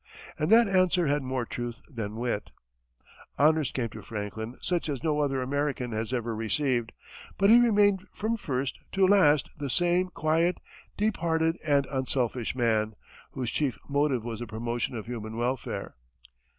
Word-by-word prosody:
And 155 - 0
that 230 +1 +7
answer 185 -2 +3
had 145 0 +1
more 130 -2 -2
truth 120 0 -5
than 110 -6 -5
wit. 115 -2 -2 0.9
Honors 155 -1 +3
came 120 -3 -2
to - - -9
Franklin 110 +2 -6
such 175 -3 -1
as 140 -1 -3
no 150 -2 +1
other 135 -3 0
American 140 -2 -1
has 110 +1 -3
ever 120 -3 -2
received, 120 +1 0 0.5
but 195 +2 +5
he 235 - +9
remained 205 -4 +3
from 220 +2 -1
first 135 - -3
to 195 -1 +4
last 180 -7 +4
the 145 -3 -4
same 175 +4 +2
quiet, 165 +1 +1 0.4
deep 210 0 +1
hearted, 165 0 +1
and 145 -2 +3
unselfish 130 -3 -1
man, 110 -3 +1 0.4
whose 125 -3 -3
chief 135 -8 0
motive 140 -4 +1
was 115 -2 -5
the 120 - -5
promotion 115 +3 -3
of 110 - -5
human 115 -2 -6
welfare. 125 +1 -2
135 Hz, 160 wpm, -28 LUFS, 120-165 Hz, 0.9 s, he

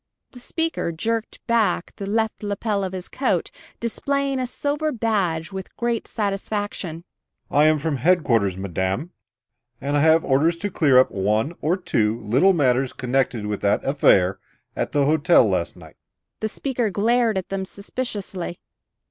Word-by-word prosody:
The 250 - -12
speaker 325 - -2
jerked 225 +7 -3
back 230 -6 +1
the 200 - -5
left 220 +1 0
lapel 205 0 -1
of 190 - -3
his 185 -1 -6
coat, 270 - -1 0.3
displaying 275 +3 -1
a 255 - -1
silver 290 +4 -1
badge 200 - -1
with 190 -1 -8
great 235 -1 -1
satisfaction. 200 -5 -3 0.5
"I 145 +1 +5
am 155 0 +4
from 150 -1 -2
headquarters, 120 - +2
madame, 95 - -2 0.7
and 140 +2 -2
I - - +3
have 160 +2 +4
orders 150 +5 +3
to 205 +3 -3
clear 145 -7 +4
up 130 - +5
one 105 - 0
or 165 +5 +1
two 115 - 0
little 130 - +4
matters 130 -5 +2
connected 125 -3 -1
with 105 -1 -3
that 100 - +1
affair 95 -9 +3 0.4
at - - -2
the 145 -1 +2
hotel 155 -3 +4
last 90 -3 -1
night." - - -15 0.4
The 220 - -2
speaker 245 -2 -2
glared 225 +2 +2
at 185 - -4
them 195 0 -2
suspiciously. 200 -3 -5
175 Hz, 155 wpm, -23 LUFS, 135-220 Hz, 0.7 s, I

